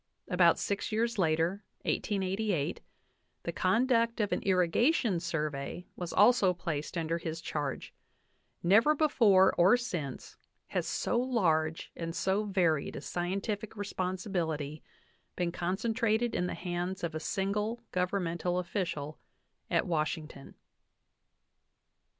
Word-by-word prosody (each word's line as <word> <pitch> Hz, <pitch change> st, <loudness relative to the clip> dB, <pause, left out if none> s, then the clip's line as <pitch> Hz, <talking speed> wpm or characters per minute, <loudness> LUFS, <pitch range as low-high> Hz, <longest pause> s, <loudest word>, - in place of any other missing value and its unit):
About 180 Hz, -3 st, +4 dB
six 200 Hz, +2 st, -2 dB
years 230 Hz, 0 st, 0 dB
later, 165 Hz, +3 st, +1 dB, 0.2 s
1888, 195 Hz, -5 st, -1 dB, 0.6 s
the 170 Hz, -, -2 dB
conduct 230 Hz, +5 st, +2 dB
of 210 Hz, -2 st, 0 dB
an -, -, 0 dB
Irrigation 190 Hz, -, +2 dB
Sur 160 Hz, -3 st, -1 dB
vey 140 Hz, +6 st, -6 dB
was 175 Hz, -2 st, -5 dB
also 205 Hz, -4 st, +5 dB
placed 165 Hz, -1 st, -4 dB
under 165 Hz, 0 st, -1 dB
his 165 Hz, -1 st, -4 dB
charge; 145 Hz, -4 st, -4 dB, 0.7 s
never 220 Hz, -, +5 dB
before 220 Hz, -11 st, +5 dB
or 185 Hz, +8 st, +6 dB
since 165 Hz, -, -5 dB, 0.3 s
has, -, -, -1 dB
so 240 Hz, -, 0 dB
large 165 Hz, -11 st, +1 dB
and 165 Hz, 0 st, -5 dB
so 195 Hz, +3 st, +1 dB
varied 175 Hz, -7 st, +1 dB
a -, -, -5 dB
scientific 195 Hz, +6 st, -3 dB
responsibility 180 Hz, -6 st, -3 dB, 0.5 s
been 175 Hz, -1 st, -1 dB
con 180 Hz, +2 st, -2 dB
centrated 230 Hz, +1 st, +1 dB
in 180 Hz, -, 0 dB
the -, -, -3 dB
hands 180 Hz, +1 st, -3 dB
of 170 Hz, -2 st, -2 dB
a 155 Hz, -, -3 dB
single 210 Hz, +7 st, -2 dB
governmental 180 Hz, -1 st, -1 dB
official 170 Hz, -5 st, -3 dB, 0.5 s
at -, -, +2 dB
Washington. 155 Hz, -3 st, -3 dB
180 Hz, 120 wpm, -31 LUFS, 165-210 Hz, 0.7 s, or